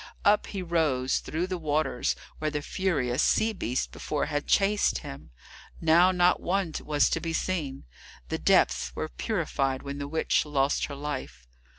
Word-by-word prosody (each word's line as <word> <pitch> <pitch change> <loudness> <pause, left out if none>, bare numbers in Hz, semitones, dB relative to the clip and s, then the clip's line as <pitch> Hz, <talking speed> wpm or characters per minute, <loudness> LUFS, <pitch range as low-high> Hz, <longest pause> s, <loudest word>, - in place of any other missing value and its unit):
Up 205 +1 +4
he 195 -2 -4
rose 150 -7 +1
through 165 +3 -3
the 185 -1 -4
waters 155 -4 0 0.2
where 155 - 0
the 150 -1 -3
furious 145 -12 0
sea 220 0 +2
beasts 125 - -1
before 150 - -3
had 145 -1 -3
chased 205 +1 +3
him. 70 - -9 0.5
Now 165 +3 +5
not 180 -1 +3
one 185 -3 -1
was 150 -1 +2
to - - +1
be 165 -1 -3
seen; 160 -7 -2 0.5
the - - -2
depths - - +2
were - - -3
purified 135 - -1
when 140 0 -5
the 140 - -4
witch 160 +2 +1
lost 145 -2 +1
her 145 - -7
life. 140 - -6
150 Hz, 165 wpm, -27 LUFS, 135-175 Hz, 0.5 s, Now